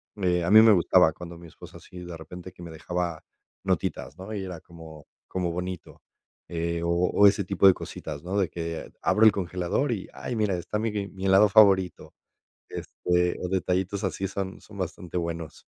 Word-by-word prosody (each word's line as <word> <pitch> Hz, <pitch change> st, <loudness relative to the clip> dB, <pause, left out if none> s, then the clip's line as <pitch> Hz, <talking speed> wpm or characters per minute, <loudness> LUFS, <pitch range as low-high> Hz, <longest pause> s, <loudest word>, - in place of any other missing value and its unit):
Me 90 Hz, -3 st, 0 dB
a 85 Hz, -, 0 dB
mí 110 Hz, +1 st, +10 dB
me 110 Hz, -1 st, +7 dB
gustaba 90 Hz, -2 st, +4 dB
cuando 85 Hz, -1 st, -10 dB
mi 85 Hz, -, -12 dB
esposa -, -, -13 dB
así 90 Hz, -, -12 dB
de 85 Hz, -2 st, -7 dB
repente 90 Hz, +3 st, -10 dB
que 90 Hz, -, -12 dB
me 85 Hz, -, -8 dB
dejaba 85 Hz, 0 st, -4 dB, 0.4 s
notitas, 75 Hz, -, -2 dB
¿no? 95 Hz, +4 st, -8 dB
Y 100 Hz, -2 st, -3 dB
era 90 Hz, -3 st, -7 dB
como 80 Hz, -3 st, -13 dB, 0.2 s
como 90 Hz, -2 st, -2 dB
bonito, 90 Hz, 0 st, -6 dB, 0.5 s
eh, 85 Hz, 0 st, -2 dB
o 85 Hz, -, -1 dB
o 90 Hz, +4 st, +3 dB
ese 100 Hz, 0 st, +2 dB
tipo 100 Hz, 0 st, +1 dB
de 95 Hz, -, +8 dB
cositas, 75 Hz, -4 st, -7 dB
¿no? 95 Hz, +3 st, -3 dB
De 95 Hz, -5 st, +1 dB
que 85 Hz, -1 st, -5 dB
abro 110 Hz, -, +3 dB
el 110 Hz, -, +9 dB
congelador 90 Hz, +7 st, -1 dB
y, 95 Hz, -, -5 dB
ay, 125 Hz, -, -5 dB
mira, 105 Hz, -4 st, +1 dB
está 95 Hz, +5 st, -4 dB
mi 115 Hz, 0 st, -1 dB, 0.2 s
mi 95 Hz, -1 st, -7 dB
helado 95 Hz, +2 st, +6 dB
favorito. 100 Hz, -4 st, +4 dB, 0.6 s
Este, 90 Hz, 0 st, -1 dB
o 90 Hz, -, -2 dB
detallitos 95 Hz, +1 st, -1 dB
así 95 Hz, -, -2 dB
son, 95 Hz, 0 st, -5 dB
son 105 Hz, -1 st, -14 dB
bastante 90 Hz, -1 st, -5 dB
buenos. 85 Hz, -2 st, -5 dB
90 Hz, 190 wpm, -26 LUFS, 85-95 Hz, 0.6 s, mí